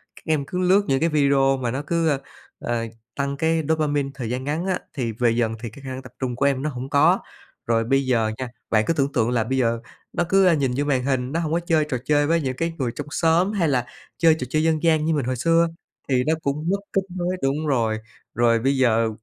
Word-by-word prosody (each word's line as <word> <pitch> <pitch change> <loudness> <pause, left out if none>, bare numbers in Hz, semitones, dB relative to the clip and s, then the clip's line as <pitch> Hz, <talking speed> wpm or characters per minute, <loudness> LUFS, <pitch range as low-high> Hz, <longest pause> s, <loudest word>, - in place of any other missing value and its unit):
Các - - -15
em 155 -3 0
cứ 180 +6 -4
lướt 185 +2 +4
những 135 -1 +2
cái 165 - +2
video 140 -3 +3
mà 125 -3 -2
nó 135 +3 -2
cứ, 165 -4 +1 0.4
ờ, 120 -1 -2 0.3
tăng 140 0 -2
cái 160 +1 +1
dopamine 145 -3 +1
thời 125 -5 -5
gian 125 +2 -3
ngắn 150 +5 -2
á, 185 -1 0
thì 120 -4 -2
về 115 +1 +1
dần 115 -1 0
thì 115 - -3
cái 125 +6 -14
khả 135 - -6
năng 130 0 -5
tập 130 - -13
trung 125 -2 -2
của 135 - 0
em 135 -2 +2
nó 155 - -1
hổng 130 -1 -6
có. 145 0 +4 0.5
Rồi 115 -1 +2
bây 135 +3 +1
giờ 115 -4 +1
nha, 130 -2 -4 0.2
bạn 110 -1 +3
cứ - - +3
tưởng 140 -3 0
tượng 115 - +2
là 120 -2 +1
bây 130 +4 -2
giờ 115 -2 +1 0.3
nó - - +1
cứ, 195 0 +5
a, 180 - +5
nhìn 140 -5 +1
vô 145 - 0
màn 135 -3 +1
hình 130 -1 -1
nó 165 - 0
hổng 160 -2 -2
có 170 - +2
chơi 165 -3 +1
trò 130 - 0
chơi 145 0 +3
với 165 +1 +2
những 130 -3 -2
cái 165 +2 -1
người 125 -4 -1
trong - - -6
xóm 165 +5 +2
hay 190 -6 +1
là 125 -4 +1 0.3
chơi 165 -2 +5
trò 125 - -4
chơi 155 +4 +1
dân 160 -1 +1
gian 160 -2 +3
như 160 - +2
mình 145 -5 0
hồi 130 +1 -1
xưa 165 +6 +3 0.4
thì 125 -2 +2
nó 155 - +1
cũng 150 +4 -1
mất 200 +1 +1
kết 195 - +2
nối 180 0 -1
đúng 145 +3 0
rồi. 115 -6 +1 0.4
Rồi 115 -1 +3
bây 135 +4 +1
giờ 115 -3 +3
140 Hz, 260 wpm, -23 LUFS, 125-160 Hz, 0.5 s, cứ